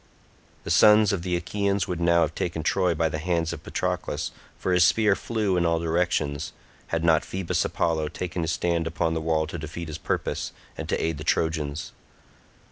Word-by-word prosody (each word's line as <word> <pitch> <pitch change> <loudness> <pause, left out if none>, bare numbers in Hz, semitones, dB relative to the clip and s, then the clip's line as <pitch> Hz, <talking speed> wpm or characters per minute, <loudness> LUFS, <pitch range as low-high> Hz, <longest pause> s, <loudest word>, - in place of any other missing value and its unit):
The - - -4
sons 105 -1 +6
of 95 - -1
the 90 0 -1
Achaeans 100 +2 0
would 90 -1 -3
now 85 0 +4
have 80 -1 +1
taken 80 -2 -3
Troy 90 +1 +2
by 80 +1 +2
the 75 0 -3
hands 85 0 0
of - - -7
Patroclus, 75 +3 -2 0.3
for 95 - -1
his 90 -2 +5
spear 105 +4 +4
flew 105 -5 -1
in 85 - +2
all 85 -1 +2
directions, 80 -3 0 0.3
had 80 0 -1
not 80 -2 +4
Phoebus 95 -2 -1
Apollo 80 -3 0
taken 85 +2 -4
his 80 0 -1
stand 85 -1 0
upon 80 0 0
the 80 - -1
wall 80 -1 +1
to 80 +2 -6
defeat 80 +2 -6
his 75 +1 -6
purpose - - -2 0.2
and - - -6
to - - +1
aid 80 -3 -1
the - - -5
Trojans. 80 -2 -1
85 Hz, 195 wpm, -26 LUFS, 80-90 Hz, 0.3 s, sons